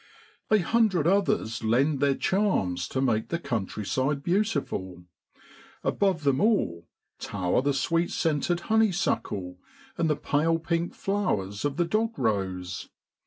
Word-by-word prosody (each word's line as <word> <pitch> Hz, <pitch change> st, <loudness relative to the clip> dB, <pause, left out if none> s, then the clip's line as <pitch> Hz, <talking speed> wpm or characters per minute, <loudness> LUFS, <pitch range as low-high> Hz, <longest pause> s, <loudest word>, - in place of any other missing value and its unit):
A 215 Hz, -, +5 dB
hundred 200 Hz, -4 st, +2 dB
others 175 Hz, -, +1 dB
lend 135 Hz, +6 st, +2 dB
their 140 Hz, -1 st, +3 dB
charms 95 Hz, -, 0 dB
to 130 Hz, -, -2 dB
make 110 Hz, -5 st, +1 dB
the 170 Hz, -, 0 dB
countryside 130 Hz, -, -2 dB
beautiful; 155 Hz, -, -1 dB, 0.8 s
above 190 Hz, -6 st, +1 dB
them 140 Hz, 0 st, +2 dB
all 85 Hz, -, +1 dB, 0.3 s
tower 95 Hz, +3 st, 0 dB
the 145 Hz, +2 st, +1 dB
sweet 165 Hz, +5 st, +1 dB
scented 165 Hz, +2 st, 0 dB
honeysuckle, 175 Hz, -, 0 dB, 0.4 s
and 165 Hz, -1 st, +2 dB
the 150 Hz, -, +2 dB
pale 155 Hz, +3 st, +1 dB
pink 170 Hz, +1 st, -2 dB
flowers 105 Hz, -, -1 dB
of 145 Hz, -1 st, -1 dB
the 175 Hz, -, +2 dB
dog 220 Hz, +5 st, 0 dB
rose. 95 Hz, -4 st, -2 dB
145 Hz, 125 wpm, -27 LUFS, -, 0.8 s, A